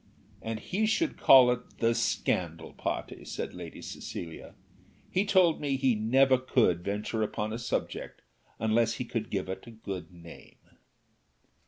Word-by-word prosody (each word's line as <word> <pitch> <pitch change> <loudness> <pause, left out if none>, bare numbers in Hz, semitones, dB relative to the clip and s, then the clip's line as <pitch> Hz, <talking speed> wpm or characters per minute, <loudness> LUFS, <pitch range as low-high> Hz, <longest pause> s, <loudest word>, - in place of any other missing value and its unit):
"And 110 -1 -4
he 210 - -1
should 310 +9 +1
call 130 -2 +7
it 125 0 -5
'The 115 0 +2
scandal 85 -8 -1
party,'" - - -4
said - - -5
Lady - - -9
Cecilia. 80 -2 -7 0.6
"He 190 +3 +2
told 180 -5 +4
me 140 -2 0
he 130 -2 +3
never 130 +4 +4
could 115 -9 +2
venture 105 +3 -2
upon 110 0 -2
a 115 - -4
subject 120 - -4 0.3
unless 110 +1 +2
he 125 - -4
could 115 -2 -3
give 95 -3 -2
it 95 +4 -6
a - - -8
good 100 -5 -7
name." 85 -1 -14
115 Hz, 150 wpm, -29 LUFS, 100-130 Hz, 0.6 s, call